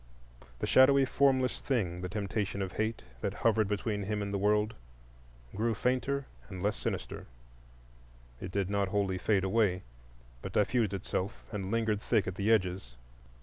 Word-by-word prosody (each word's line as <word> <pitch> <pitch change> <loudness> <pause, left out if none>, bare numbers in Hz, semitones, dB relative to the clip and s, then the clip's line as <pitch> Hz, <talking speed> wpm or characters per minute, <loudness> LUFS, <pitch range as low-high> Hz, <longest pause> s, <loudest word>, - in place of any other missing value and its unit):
The - - -2
shadowy, 135 +1 +6
formless 130 -1 +2
thing—the 90 -8 -1
temptation 100 0 -2
of 95 - -4
Hate, 110 +2 -2 0.2
that - - -2
hovered 110 -2 +2
between 105 +1 -1
him 105 +1 -2
and 100 0 -4
the 100 - 0
world—grew - - -3
fainter 130 +4 0 0.2
and 95 -2 -6
less 105 +1 +1
sinister. - - -4 1.1
It 95 - -5
did 100 -1 0
not 100 -1 +1
wholly 95 -1 0
fade 100 0 +2
away, 95 -2 +2 0.6
but - - -6
diffused 105 -1 +2
itself 95 +2 -3
and 100 -3 -4
lingered 110 -2 0
thick 110 -4 +2
at 95 - -3
the 100 +4 0
edges. 90 - 0
105 Hz, 150 wpm, -31 LUFS, 95-110 Hz, 1.1 s, shadowy